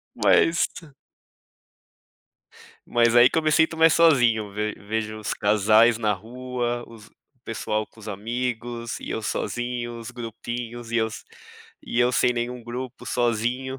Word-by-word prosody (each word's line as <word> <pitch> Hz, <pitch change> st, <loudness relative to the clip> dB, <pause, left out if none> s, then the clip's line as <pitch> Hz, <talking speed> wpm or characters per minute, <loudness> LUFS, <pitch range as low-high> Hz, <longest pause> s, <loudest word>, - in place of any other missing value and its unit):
Mas 170 Hz, +1 st, +3 dB, 2.2 s
Mas, 120 Hz, 0 st, +3 dB
aí 120 Hz, +2 st, +7 dB
que -, -, +1 dB
eu -, -, 0 dB
me 155 Hz, 0 st, +2 dB
sinto 160 Hz, +1 st, +3 dB
mais 160 Hz, 0 st, +6 dB
sozinho, 120 Hz, -10 st, +4 dB
ve 105 Hz, +1 st, -2 dB
vejo 110 Hz, +1 st, -4 dB
os 105 Hz, -2 st, -3 dB
casais 110 Hz, +3 st, +4 dB
na 105 Hz, -2 st, +1 dB
rua, 120 Hz, +3 st, -4 dB
os 115 Hz, -2 st, -14 dB
o 125 Hz, -3 st, -41 dB
pessoal 110 Hz, -1 st, -2 dB
com -, -, -24 dB
os 110 Hz, -, -12 dB
amigos, 120 Hz, +2 st, -4 dB
e -, -, -7 dB
eu 110 Hz, -, -2 dB
sozinho, 120 Hz, +1 st, -3 dB
os 115 Hz, +2 st, -8 dB
grupinhos, 120 Hz, 0 st, -6 dB
e -, -, +1 dB
eu 110 Hz, -, +1 dB, 0.7 s
e 120 Hz, -, -3 dB
eu 125 Hz, +1 st, +3 dB
sem 125 Hz, -, +3 dB
nenhum 120 Hz, 0 st, -4 dB
grupo, 125 Hz, +2 st, -7 dB
sozinho. 120 Hz, +3 st, -1 dB
120 Hz, 150 wpm, -24 LUFS, 110-125 Hz, 2.2 s, aí